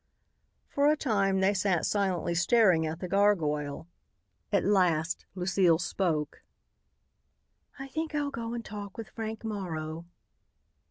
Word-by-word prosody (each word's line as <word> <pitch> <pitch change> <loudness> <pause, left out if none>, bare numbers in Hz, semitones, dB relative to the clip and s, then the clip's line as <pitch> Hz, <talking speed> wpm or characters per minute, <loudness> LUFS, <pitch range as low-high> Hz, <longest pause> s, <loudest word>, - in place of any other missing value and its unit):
For 285 0 +1
a 305 +1 +4
time 200 -8 +1
they 195 +2 +3
sat 185 -3 +1
silently 190 -4 0
staring 175 -2 +4
at 160 +1 -5
the 180 - -3
gargoyle. 165 -7 +1 0.6
At - - +2
last 175 -5 +1
Lucile 180 -2 +3
spoke. 165 -3 -2 1.4
"I 270 0 -7
think 315 +2 -4
I'll 290 -1 -1
go 230 -2 -4
and 235 - -5
talk 205 -2 -8
with 225 - -7
Frank 220 -1 -6
Morrow." 170 -6 -5
195 Hz, 125 wpm, -29 LUFS, 170-220 Hz, 1.4 s, a